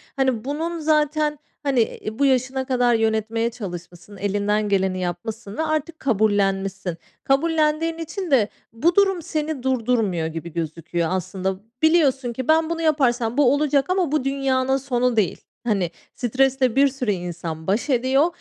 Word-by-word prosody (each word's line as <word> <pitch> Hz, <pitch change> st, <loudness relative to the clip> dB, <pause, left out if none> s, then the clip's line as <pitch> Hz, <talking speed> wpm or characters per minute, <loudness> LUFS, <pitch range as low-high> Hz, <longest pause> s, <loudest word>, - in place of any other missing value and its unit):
hani 260 Hz, -4 st, 0 dB
bunun 325 Hz, +4 st, -3 dB
zaten 305 Hz, -1 st, +1 dB, 0.2 s
hani, 275 Hz, -4 st, +2 dB
iii, 220 Hz, +1 st, -4 dB
bu 280 Hz, -, +4 dB
yaşına 260 Hz, 0 st, +1 dB
kadar 245 Hz, -2 st, +2 dB
yönetmeye 225 Hz, +1 st, 0 dB
çalışmışsın, 180 Hz, -2 st, -9 dB
elinden 205 Hz, +1 st, 0 dB
geleni 190 Hz, -2 st, +1 dB
yapmışsın 200 Hz, +4 st, -5 dB
ve -, -, 0 dB
artık 310 Hz, +1 st, -2 dB
kabullenmişsin. 195 Hz, -5 st, 0 dB, 0.3 s
Kabullendiğin 315 Hz, +3 st, +1 dB
için 330 Hz, +2 st, -5 dB
de 235 Hz, -7 st, +4 dB, 0.3 s
bu 325 Hz, +10 st, +2 dB
durum 390 Hz, -3 st, +3 dB
seni 310 Hz, -3 st, -3 dB
durdurmuyor 225 Hz, -9 st, +1 dB
gibi 165 Hz, 0 st, -6 dB
gözüküyor 165 Hz, 0 st, -2 dB
aslında. 190 Hz, +1 st, -2 dB, 0.3 s
Biliyorsun 280 Hz, -6 st, +3 dB
ki 260 Hz, +1 st, -5 dB
ben 320 Hz, +1 st, +3 dB
bunu 335 Hz, 0 st, -2 dB
yaparsam 250 Hz, -7 st, +1 dB
bu 275 Hz, -3 st, +5 dB
olacak 285 Hz, -1 st, +1 dB
ama 370 Hz, -5 st, +1 dB
bu 305 Hz, -3 st, +1 dB
dünyanın 270 Hz, -1 st, +1 dB
sonu 250 Hz, -2 st, 0 dB
değil. 210 Hz, -5 st, +1 dB, 0.3 s
Hani 195 Hz, -6 st, +1 dB, 0.2 s
stresle 255 Hz, 0 st, +1 dB
bir 280 Hz, +1 st, +6 dB
sürü 260 Hz, -5 st, -2 dB
insan 170 Hz, -3 st, -5 dB
baş 210 Hz, +9 st, 0 dB
ediyor 260 Hz, +4 st, +3 dB
250 Hz, 145 wpm, -22 LUFS, 205-295 Hz, 0.3 s, bir